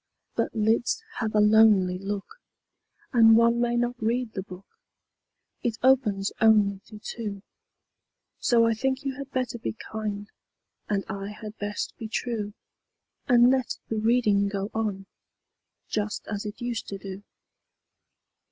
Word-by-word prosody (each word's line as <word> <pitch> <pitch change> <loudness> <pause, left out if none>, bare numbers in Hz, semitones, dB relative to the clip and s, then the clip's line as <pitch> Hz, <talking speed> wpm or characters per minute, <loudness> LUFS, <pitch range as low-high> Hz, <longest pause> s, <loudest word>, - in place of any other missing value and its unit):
But - - -1
lids 225 - +1 0.2
have 220 -2 -2
a - - +5
lonely 210 -4 +5
look, 200 - -5 0.8
And 225 -2 +7
one 235 +1 +4
may 240 0 +1
not 240 0 -1
read 235 +1 0
the 190 - -3
book 185 0 -11 1.0
It 230 -2 -1
opens 220 -7 +3
only 210 -3 +4
to 215 - -11
two; 210 -2 -6 1.0
So 235 -2 +4
I 230 - +3
think 265 +4 -1
you 270 -2 -3
had 275 -1 -7
better 255 -3 -2
be - - -3 0.2
kind, 210 -2 -4 0.6
And 200 -2 0
I 195 0 -5
had 215 +1 -8
best 205 0 -3
be 225 - -5
true, 220 -2 -3 0.7
And 245 0 +6
let 260 -2 0
the 220 - -1
reading 215 -3 +3
go 200 +1 -3
on, 210 -3 -2 0.8
Just 210 0 -2
as 210 0 -4
it 210 - -8
used 240 -1 -3
to 200 - -5
do. 195 0 -8
220 Hz, 145 wpm, -26 LUFS, 205-240 Hz, 1.0 s, And